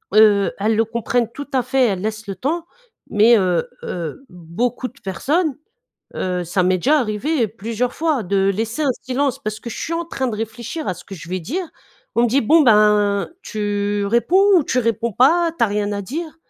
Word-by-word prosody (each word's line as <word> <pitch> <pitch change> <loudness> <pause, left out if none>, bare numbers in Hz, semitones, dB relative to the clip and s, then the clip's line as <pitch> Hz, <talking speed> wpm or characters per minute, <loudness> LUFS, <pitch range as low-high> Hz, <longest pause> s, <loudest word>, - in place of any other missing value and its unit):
Heu, 210 -2 +5
elles 215 +2 +1
le 225 - +3
comprennent 235 +1 -1
tout 285 +4 -8
à 260 -2 +2
fait, 260 0 +2
elles 190 -3 -1
laissent 215 +1 -4
le 195 - -4
temps, 320 - -2 0.4
mais 225 +2 +5
heu 180 -3 0
heu, 175 - -5
beaucoup 190 +9 -3
de 275 - -23
personnes, 290 - 0 0.6
heu, 180 -1 -1
ça 180 +2 0
m'est 185 0 +2
déjà 295 - +3
arrivé 235 +3 0
plusieurs 230 +3 -3
fois 305 - 0
de 195 +1 +1
laisser 225 +9 -2
un 280 - +2
silence, 260 +1 -1
parce 215 +1 -5
que 235 - -7
je - - -7
suis 330 - -3
en 335 +1 -1
train 265 -5 -3
de 225 - -3
réfléchir 225 +7 -5
à 185 - -1
ce 180 +1 -13
que 195 - -9
je 170 -2 -10
vais 185 +1 -2
dire, 335 - -4 0.5
on 235 - +4
me - - +2
dit: 265 +5 +3
«Bon 310 +8 +5
ben, 210 -3 +4
tu 205 -1 -2
réponds 370 - +4
ou 295 - 0
tu 250 - +1
réponds 230 -1 -1
pas? 330 - +3
T'as 230 - +4
rien 205 0 -1
à 200 0 -3
dire?» 315 - -6
225 Hz, 205 wpm, -20 LUFS, 200-270 Hz, 0.6 s, Heu